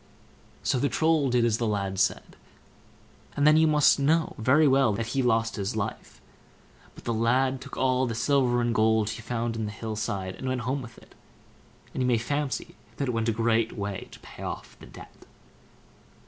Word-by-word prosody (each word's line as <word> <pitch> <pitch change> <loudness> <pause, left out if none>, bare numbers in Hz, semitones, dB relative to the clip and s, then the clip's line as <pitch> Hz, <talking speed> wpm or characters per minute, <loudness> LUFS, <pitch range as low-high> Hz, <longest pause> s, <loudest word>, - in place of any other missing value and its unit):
So 130 - +1
the 140 +2 +1
Troll 155 +2 +2
did 120 -1 +2
as 115 -1 +1
the 115 - 0
lad 100 -2 -2
said, 95 - 0 1.0
and 145 - +2
then 155 0 +7
you 160 0 +5
must 150 -2 +4
know 160 +4 +2
very 140 +7 +4
well 135 -4 +3
that 110 +3 -2
he 135 - +1
lost 115 -2 +1
his 100 +3 -3
life; 110 -2 -5 0.8
but - - -13
the 115 - -2
lad 130 +4 +1
took 140 +1 -9
all 130 0 +2
the 115 - -3
silver 120 0 +2
and 120 -1 0
gold 110 -1 +2
that - - -3
he - - -8
found 115 0 -3
in 110 -1 -2
the 105 - -4
hill 110 0 -5
side, 95 -3 -3
and 130 - -7
went 130 -1 -1
home 130 +4 -2
with 120 -1 -11
it, - - -18 0.8
and - - -3
you 125 - +1
may 120 -2 +3
fancy 145 +4 -3 0.2
it 135 -3 -1
went 115 0 0
a - - +3
great 115 0 +1
way 100 -2 -5
to - - -14
pay - - -13
off - - -6
the - - -13
debt. - - -14
120 Hz, 205 wpm, -27 LUFS, 110-135 Hz, 1.0 s, then